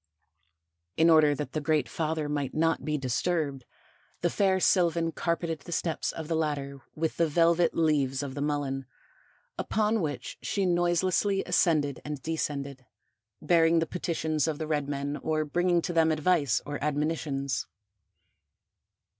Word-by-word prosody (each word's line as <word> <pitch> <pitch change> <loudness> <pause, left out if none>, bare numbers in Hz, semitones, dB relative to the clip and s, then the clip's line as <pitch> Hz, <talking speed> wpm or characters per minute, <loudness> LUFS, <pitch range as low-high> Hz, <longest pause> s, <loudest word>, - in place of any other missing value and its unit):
In 165 +1 +5
order 155 -2 +5
that 150 +1 -5
the 155 - -2
Great 150 -3 +1
Father 155 +2 -2
might 145 -2 -2
not 165 +1 +1
be 150 -1 -1
disturbed, 140 0 -1 0.6
the 175 - +1
fair 190 -2 +2
sylvan 170 -3 +2
carpeted 170 -1 -2
the 175 - -11
steps 165 -1 -1
of 160 -2 -7
the 165 - -1
ladder 140 -3 -2
with 160 0 -2
the 170 - +3
velvet 170 +2 +3
leaves 145 -4 +1
of 135 -2 -5
the 140 - -5
Mullen, 140 -3 -2 0.7
upon 215 0 +1
which 145 -5 -4
she 200 -2 -1
noiselessly 180 +3 +1
ascended 155 -6 +1
and 150 -1 -5
descended, 140 -5 -3 0.6
bearing 165 -1 +4
the 165 - +2
petitions 160 -3 -1
of 155 -2 -1
the 155 - -3
red 145 -2 -1
men 140 +1 -3
or 155 -1 -1
bringing 175 +2 +1
to 175 - -3
them 160 -1 +4
advice 155 -4 +1
or 145 0 -5
admonitions. 145 -2 -1
155 Hz, 145 wpm, -28 LUFS, 145-170 Hz, 0.7 s, In